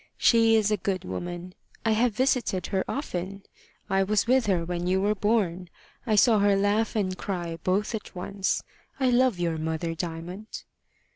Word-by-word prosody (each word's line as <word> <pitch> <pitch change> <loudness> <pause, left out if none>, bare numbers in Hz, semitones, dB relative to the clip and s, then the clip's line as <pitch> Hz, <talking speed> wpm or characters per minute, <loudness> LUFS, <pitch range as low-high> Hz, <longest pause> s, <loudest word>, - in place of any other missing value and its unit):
"She 225 -1 +5
is 215 -1 +2
a 210 - +2
good 190 0 -2
woman. 175 - -5 0.3
I 225 - +3
have 225 0 +2
visited 250 -7 +1
her 190 - +2
often. 195 - -4 0.4
I 195 -1 +2
was 205 +1 +2
with 255 -1 +3
her 180 -4 +1
when 175 0 -3
you 185 +1 +2
were 205 +2 +2
born. 190 -4 0 0.4
I 215 - +3
saw 220 +1 +5
her 200 0 +4
laugh 205 +3 +1
and 190 -4 0
cry 175 -4 -4
both 200 +5 0
at 215 -3 -6
once. 190 +2 -2 0.4
I 260 -2 +3
love 250 -4 +3
your 170 -2 -1
mother, 160 +1 -2
Diamond." 175 +5 -6
195 Hz, 170 wpm, -26 LUFS, 180-220 Hz, 0.4 s, She